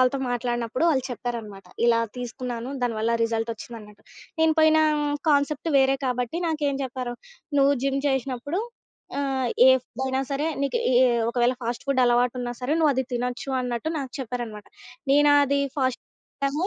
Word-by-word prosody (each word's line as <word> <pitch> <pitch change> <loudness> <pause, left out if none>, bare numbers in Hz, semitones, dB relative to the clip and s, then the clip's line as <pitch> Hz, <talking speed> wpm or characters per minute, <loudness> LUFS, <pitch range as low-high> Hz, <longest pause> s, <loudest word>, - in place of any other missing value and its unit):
వాళ్ళతో 255 +2 +2
మాట్లాడినపుడు 240 +2 -1
వాళ్ళు 265 -4 +1
చెప్పారనమాట. 230 -5 -6 0.2
ఇలా 230 -1 +4 0.2
తీసుకున్నాను 245 0 -5
దానివల్ల 230 -1 0
రిజల్ట్ 225 0 -1
ఒచ్చిందన్నట్టు. 215 -2 -11 0.4
నేను 320 0 +4
పోయిన 315 0 +5 0.5
కాన్సెప్ట్ 290 +2 +1
వేరే 270 0 +3
కాబట్టి 250 +3 -2
నాకేం 295 -3 0
చెప్పారు, 255 -2 -4 0.4
"నువ్వు 275 +1 +5
జిమ్ 275 0 +1
జేశినప్పుడు. 270 - -2 0.6
ఆహ్, 265 -3 -1 0.2
ఏ - - +9
ఫుడ్ 255 0 -8
అయినా 265 0 0
సరే 280 +2 -1 0.2
నీకు 280 +11 0 0.2
ఏ - - +6 0.3
ఒకవేళ 245 +1 +2
ఫాస్ట్ 235 0 -3
ఫుడ్ 275 -2 +2
అలవాటున్నా 245 0 +1
సరే 255 +4 -1
నువ్వది 275 -4 +3
తినొచ్చు 250 +2 -3
అన్నట్టు" 245 +3 -2
నాకు 265 -3 -5
చెప్పారనమాట. 235 -4 -5 0.5
నేను 290 +1 +5
అది 280 +1 +1 0.2
ఫాస్ట్ 260 -2 0 0.4
టము 295 +6 0
255 Hz, 145 wpm, -25 LUFS, 240-275 Hz, 0.6 s, ఏ